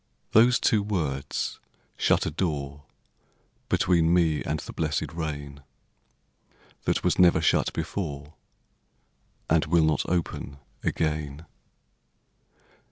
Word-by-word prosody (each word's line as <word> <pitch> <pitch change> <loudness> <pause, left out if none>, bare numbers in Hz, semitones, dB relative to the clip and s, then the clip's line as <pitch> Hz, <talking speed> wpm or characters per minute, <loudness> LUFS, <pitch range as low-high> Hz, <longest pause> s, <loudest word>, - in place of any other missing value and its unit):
Those 120 +3 +5
two 110 -3 +3
words 80 -10 -2 0.4
shut - - +2
a - - -2
door 75 -4 -3 0.8
Between 85 -2 +3
me 85 -3 +2
and 75 +1 -2
the - - -8
blessed 80 -1 -2
rain 70 -3 -5 1.2
That - - 0
was - - +1
never 90 -3 +6
shut 80 - +2
before 75 -5 -4 1.1
And 80 0 +2
will 85 0 +4
not 75 -2 0
open 85 -5 -2 0.2
again. 75 -1 -2
80 Hz, 100 wpm, -26 LUFS, 75-85 Hz, 1.2 s, never